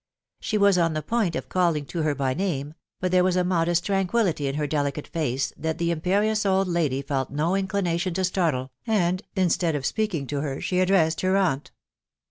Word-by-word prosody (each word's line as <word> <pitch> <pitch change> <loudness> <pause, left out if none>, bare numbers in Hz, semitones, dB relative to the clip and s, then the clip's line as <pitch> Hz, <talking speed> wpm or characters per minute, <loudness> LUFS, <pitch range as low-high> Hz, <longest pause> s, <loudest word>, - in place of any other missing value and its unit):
She 215 - -1
was 200 -3 +4
on 165 -1 +2
the 155 -1 -3
point 205 -2 0
of - - -4
calling 170 -5 +1
to 165 +4 -4
her 155 -2 0
by 135 -1 0
name; 150 -4 -2 0.3
but 185 0 -1
there 180 0 +4
was 185 -1 +2
a 180 - +2
modest 175 -1 +1
tranquillity 195 -5 +1
in 135 - -2
her 150 0 -1
delicate 145 0 -2
face, 140 -5 -2
that 160 0 -3
the 170 0 0
imperious 200 +6 +1
old 195 -1 +2
lady 155 -6 0
felt 135 -2 -2
no 155 +5 0
inclination 185 -3 -1
to 190 - 0
startle, 160 -9 0 0.2
and 185 -4 +1
instead 175 -3 +1
of 140 -2 -3
speaking 205 -9 -1
to 140 +1 -3
her, 140 -2 -3
she 180 - -1
addressed 180 -4 +2
her 185 +1 +2
aunt. 160 -8 0
170 Hz, 200 wpm, -25 LUFS, 150-190 Hz, 0.3 s, was